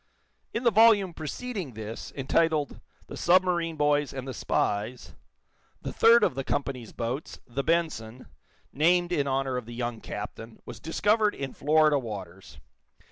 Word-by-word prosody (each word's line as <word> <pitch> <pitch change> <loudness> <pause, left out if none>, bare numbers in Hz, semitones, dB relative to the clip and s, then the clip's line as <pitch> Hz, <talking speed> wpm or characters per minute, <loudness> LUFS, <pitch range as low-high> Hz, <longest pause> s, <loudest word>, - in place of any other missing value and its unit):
In 235 - -3
the 235 - +4
volume 210 -4 +5
preceding 165 - -5
this, 110 +1 -7
entitled 150 +2 +1 0.3
"The - - -9
Submarine 175 -2 +2
Boys 145 -1 +1
and 130 0 -5
the 130 - -4
Spies," 110 +2 -2 0.7
the - - -4
third 230 0 +6
of - - +3
the 135 +1 -3
company's 135 -4 -3
boats, 125 +5 -4
the 125 +3 -3
"Benson," 135 -9 -1 0.5
named 175 +4 +3
in 145 -5 +1
honor 135 -1 0
of 120 -3 -6
the 120 - -8
young 120 -2 -3
captain, 110 +2 -7
was - - -9
discovered 210 +6 +1
in 135 -2 -5
Florida 155 0 +3
waters. 95 -6 -8
145 Hz, 145 wpm, -27 LUFS, 120-175 Hz, 0.7 s, third